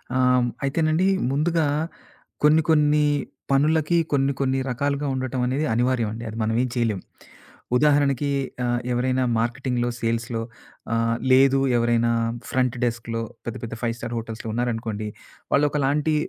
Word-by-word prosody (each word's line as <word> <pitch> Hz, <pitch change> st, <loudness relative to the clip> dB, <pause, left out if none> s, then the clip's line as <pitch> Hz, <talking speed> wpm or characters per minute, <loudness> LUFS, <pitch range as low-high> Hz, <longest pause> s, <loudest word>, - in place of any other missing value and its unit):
ఆ! -, -, +2 dB, 0.5 s
అయితేనండి 155 Hz, +5 st, +1 dB, 0.2 s
ముందుగా 160 Hz, +2 st, +1 dB, 0.8 s
కొన్ని, 155 Hz, +2 st, +6 dB
కొన్ని 150 Hz, -1 st, +4 dB, 0.5 s
పనులకి 155 Hz, +4 st, +3 dB
కొన్ని, 140 Hz, -1 st, +2 dB
కొన్ని 135 Hz, 0 st, +1 dB
రకాలుగా 140 Hz, +3 st, -1 dB
ఉండటమనేది 130 Hz, +2 st, -1 dB
అనివార్యమండి. 115 Hz, -2 st, 0 dB
అది 110 Hz, -, -7 dB
మనం 110 Hz, +1 st, 0 dB
ఏం 130 Hz, -, -2 dB
చేయలేం. 115 Hz, -6 st, 0 dB, 0.8 s
ఉదాహరణకి 145 Hz, -1 st, +2 dB, 0.3 s
ఆహ్, 120 Hz, 0 st, +1 dB
ఎవరైనా 130 Hz, +1 st, +1 dB, 0.2 s
మార్కెటింగ్‌‌లో, 120 Hz, +1 st, -1 dB
సేల్స్‌‌‌లో 115 Hz, 0 st, -1 dB, 0.5 s
ఆహ్, 115 Hz, 0 st, +1 dB, 0.2 s
లేదు 135 Hz, +1 st, +5 dB, 0.2 s
ఎవరైనా 120 Hz, 0 st, +2 dB, 0.4 s
ఫ్రంట్ 130 Hz, -1 st, +1 dB
డెస్క్‌‌లో 115 Hz, -1 st, -3 dB, 0.2 s
పెద్ద, 120 Hz, -, -4 dB
పెద్ద 115 Hz, 0 st, -5 dB
5 115 Hz, -1 st, -1 dB
స్టార్ 120 Hz, 0 st, -5 dB
హోటల్స్‌‌లో 115 Hz, 0 st, -6 dB
ఉన్నారనుకోండి. 115 Hz, -3 st, -2 dB, 0.5 s
వాళ్ళు 145 Hz, +1 st, +4 dB
ఒకలాంటి 150 Hz, +2 st, +1 dB
130 Hz, 120 wpm, -24 LUFS, 115-145 Hz, 0.8 s, కొన్ని